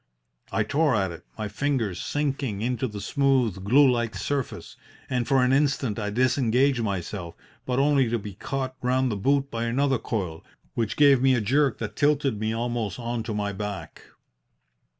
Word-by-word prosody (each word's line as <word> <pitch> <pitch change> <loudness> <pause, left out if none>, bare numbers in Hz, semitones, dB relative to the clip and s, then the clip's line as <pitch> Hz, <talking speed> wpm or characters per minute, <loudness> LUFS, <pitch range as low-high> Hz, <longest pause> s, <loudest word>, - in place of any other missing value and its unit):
I 110 - +1
tore 145 +4 +2
at 95 -3 0
it, 85 0 -11
my 110 -1 -3
fingers 115 -7 -1
sinking 135 -8 -2
into 125 +1 -1
the 105 -3 -7
smooth, 130 -9 +1
glue 135 +8 +5
like 120 -3 0
surface, 140 -3 -3 0.4
and 125 -2 0
for 135 -2 +3
an 125 +1 +3
instant 135 -6 +1
I 105 -1 -2
disengaged 130 +2 +2
myself, 95 -4 -4 0.3
but 125 -1 0
only 140 -3 +3
to 120 - +1
be 105 -2 -7
caught 130 +5 -4
round 130 0 +1
the - - -1
boot 140 +6 +1
by 115 0 -2
another 135 +2 +1
coil, 90 -8 -4 0.3
which 110 -2 -2
gave 140 -3 +6
me 130 -1 +4
a - - +1
jerk 135 +5 +2
that 110 - -5
tilted 140 -6 +1
me 110 +1 -1
almost 115 -3 -2
on 120 -1 -3
to 110 -1 -4
my 100 -1 -2
back. 105 0 -6
120 Hz, 175 wpm, -25 LUFS, 105-135 Hz, 0.4 s, gave